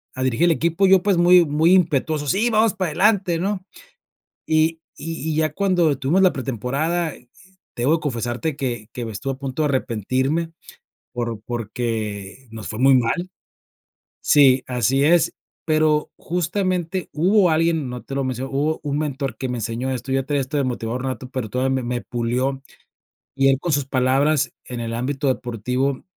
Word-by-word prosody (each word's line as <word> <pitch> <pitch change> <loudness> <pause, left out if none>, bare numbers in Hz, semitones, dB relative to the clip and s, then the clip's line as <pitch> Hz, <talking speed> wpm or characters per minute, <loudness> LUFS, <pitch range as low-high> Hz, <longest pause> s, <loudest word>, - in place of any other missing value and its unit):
a 130 - -2
dirigir 130 +5 +2
el 175 - +4
equipo, 165 +4 +1
yo 190 -1 +6
pues, 200 -3 +2
muy 175 +1 +6
muy 155 +4 +3
impetuoso: 155 -4 +1
"Sí, 205 +9 +2
vamos 220 -1 +3
para 185 -3 -1
adelante, 190 -1 +2
¿no?" 190 +1 -2 0.8
Y 160 +1 +2 0.2
y 160 -1 -4
y - - -2
ya 155 -1 +1
cuando 175 -5 +2
tuvimos 145 +8 +2
la 185 - +5
pretemporada, 140 +7 -2 0.6
debo 140 +7 +2
que - - -16
confesarte 120 +3 -2
que 120 -6 -4
que 120 - -5
me 115 - -5
estuve 135 +7 -3
a - - -13
punto 135 +2 -3
de - - +2
arrepentirme 130 - -1 0.6
por 120 -3 -3
porque 115 -1 -4
nos 110 -1 -8
fue 110 - -5
muy 135 +1 +6
mal. 150 +10 0 0.9
Sí, 135 -3 +5
así 130 +2 +1
es, 170 +3 +3 0.3
pero, 155 -1 +2
justamente, 180 0 -2
hubo 185 +4 +3
alguien, 160 -3 +1
no 125 0 -6
te 135 - -7
lo 135 - 0
menciono 130 +1 -3
hubo 150 +3 0
un 145 -1 -2
mentor 140 -5 -3
que 130 - -4
me 125 -1 -3
enseñó 115 +4 -3
esto, 130 +1 -5
ya 135 0 +1
traía 145 +1 0
este 130 +3 -4
de 140 - +1
motivador 125 0 -3
nato, 130 -1 -4
pero 130 -4 -4
todavía 130 +4 0
me 130 - -2
me 120 0 -2
pulió. 125 +3 -2 0.7
Y 135 0 +3
él 135 - +3
con 170 +3 -2
sus 140 -1 +1
palabras 135 +2 +2
en 125 -1 -6
el 115 0 -4
ámbito 135 +4 -2
deportivo, 125 +2 -1
140 Hz, 175 wpm, -22 LUFS, 125-165 Hz, 0.9 s, yo